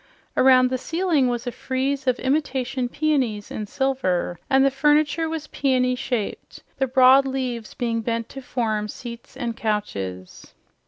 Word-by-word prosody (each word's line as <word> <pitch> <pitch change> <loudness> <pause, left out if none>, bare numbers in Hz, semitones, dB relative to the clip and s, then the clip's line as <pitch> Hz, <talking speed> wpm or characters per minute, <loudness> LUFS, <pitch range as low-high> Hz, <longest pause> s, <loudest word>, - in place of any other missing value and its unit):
Around 255 -1 +5
the 255 - -1
ceiling 325 -3 +1
was 240 -1 -2
a 245 - -2
frieze 265 +2 -2
of 250 -1 +3
imitation 265 -3 -1
peonies 260 -9 0
in 210 - -4
silver, 200 -10 -1
and 270 0 +5
the 275 - +3
furniture 300 +3 +2
was 320 -2 -4
peony 255 -4 +1
shaped, 250 -4 -4 0.2
the 265 - +2
broad 260 +1 +6
leaves 250 -4 -4
being 230 -3 -1
bent 230 0 -2
to 270 - -8
form 220 -5 -2
seats 235 +2 -9
and 235 -2 -3
couches. 100 - -4
255 Hz, 150 wpm, -23 LUFS, 230-270 Hz, 0.2 s, broad